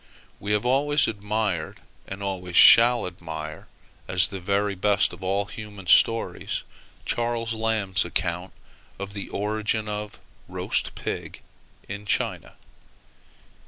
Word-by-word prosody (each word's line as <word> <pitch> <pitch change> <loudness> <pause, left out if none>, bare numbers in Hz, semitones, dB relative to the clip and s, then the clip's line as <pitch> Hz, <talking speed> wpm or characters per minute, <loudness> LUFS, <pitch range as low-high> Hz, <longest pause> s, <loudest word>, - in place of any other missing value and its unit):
We 100 - -4
have 105 +2 0
always 145 +3 +3
admired, 105 -5 -2 0.3
and 95 +1 -7
always 90 -2 -4
shall 120 +5 +8
admire, 80 -3 -7 0.4
as 90 -1 +4
the 100 -3 -6
very 100 +2 0
best 100 +1 +2
of 90 - -11
all 100 +2 0
human 105 -3 -10
stories, 115 +5 +3 0.4
Charles 115 -1 -1
Lamb's 110 -4 0
account 90 +2 -3 0.5
of 100 0 -6
the 100 -1 -6
origin 105 +1 -1
of 105 0 -5 0.3
roast - - -2
pig - - -5 0.5
in 100 +2 -7
China. - - -1
100 Hz, 120 wpm, -25 LUFS, 95-110 Hz, 0.5 s, shall